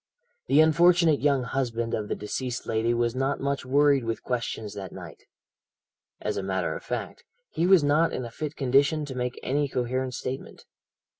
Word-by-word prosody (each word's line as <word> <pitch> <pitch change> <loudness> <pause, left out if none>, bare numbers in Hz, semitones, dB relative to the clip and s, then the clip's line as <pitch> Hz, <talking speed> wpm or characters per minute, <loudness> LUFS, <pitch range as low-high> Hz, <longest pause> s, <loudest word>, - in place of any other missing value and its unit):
"The 145 - +5
unfortunate 170 0 +4
young 140 -3 +2
husband 115 -2 -2
of 105 -1 -2
the - - -2
deceased 125 +4 -4
lady 110 +1 0
was 120 -1 +1
not 135 +2 -1
much 140 -1 -2
worried 140 0 +4
with 115 -1 -3
questions 115 -4 -3
that 100 -2 -7
night. - - -11 0.9
As - - -3
a - - -1
matter 95 -1 -1
of - - -8
fact, - - -5 0.3
he 170 - 0
was 185 -4 +6
not 150 +3 +3
in 130 - -4
a 115 - -8
fit 155 +4 -5
condition 140 +3 +2
to 140 - -7
make 125 0 -3
any 145 +2 0
coherent 130 0 -2
statement. 130 +1 -6
130 Hz, 175 wpm, -26 LUFS, 120-145 Hz, 0.9 s, was